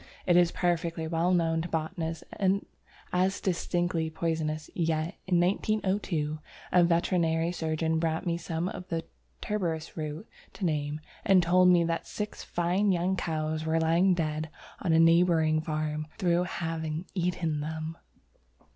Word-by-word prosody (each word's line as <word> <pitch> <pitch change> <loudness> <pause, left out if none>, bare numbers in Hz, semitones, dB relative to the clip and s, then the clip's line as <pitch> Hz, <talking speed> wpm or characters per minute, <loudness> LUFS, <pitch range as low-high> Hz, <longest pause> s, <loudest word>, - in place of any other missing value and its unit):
It 175 - +4
is 175 -1 +5
perfectly 170 -2 -1
well 165 +2 +1
known 165 -2 +2
to 170 - -4
botanists 160 0 -3 0.9
as 185 +2 +2
distinctly 175 -2 0
poisonous, 155 -1 -2
yet 160 0 0
in 180 -2 +3
1902 185 -5 0 0.3
a 180 - +6
veterinary 170 -1 +2
surgeon 160 -1 -1
brought 160 +2 -1
me 170 -1 +1
some 170 0 -3
of 180 -1 -6
the 165 -1 -2 0.4
tuberous 170 -7 -2
roots 155 +5 -5 0.3
to 195 - -4
name, 150 -2 -1 0.2
and 190 -3 +5
told 180 +2 +5
me 175 -1 +6
that 165 0 -2
six 210 0 -5
fine 180 +4 +1
young 180 +1 +1
cows 155 -2 -2
were 160 +1 +2
lying 170 +3 +3
dead 155 -1 -2 0.3
on 175 - 0
a 160 - +5
neighbouring 165 -2 +4
farm 155 -1 -2
through 175 -3 +2
having 160 -1 -3
eaten 175 -4 -1
them! 160 +2 -4
165 Hz, 140 wpm, -29 LUFS, 160-180 Hz, 0.9 s, a